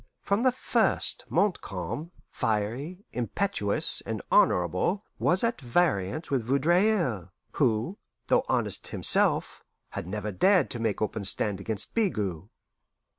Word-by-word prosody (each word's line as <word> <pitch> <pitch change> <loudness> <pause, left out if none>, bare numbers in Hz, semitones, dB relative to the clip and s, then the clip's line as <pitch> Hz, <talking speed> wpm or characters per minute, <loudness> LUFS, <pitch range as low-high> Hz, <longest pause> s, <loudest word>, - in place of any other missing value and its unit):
From 200 +3 +1
the 255 +1 +4
first, 250 - +1
Montcalm, 115 - -2 0.2
fiery, 120 - -2
impetuous, 120 - +1
and - - -4
honourable, 90 - +2
was 185 +4 +4
at 230 -6 -1
variance 130 - 0
with 130 -4 +1
Vaudreuil, 150 - +1 0.2
who, 125 - 0 0.3
though - - +2
honest - - 0
himself, - - +1 0.3
had 85 - -6
never 105 +2 -4
dared 180 - +3
to 120 - -3
make 110 -2 -1
open 110 -1 -3
stand 100 0 0
against 110 0 -4
Bigot. 105 - -1
120 Hz, 120 wpm, -27 LUFS, -, 0.3 s, the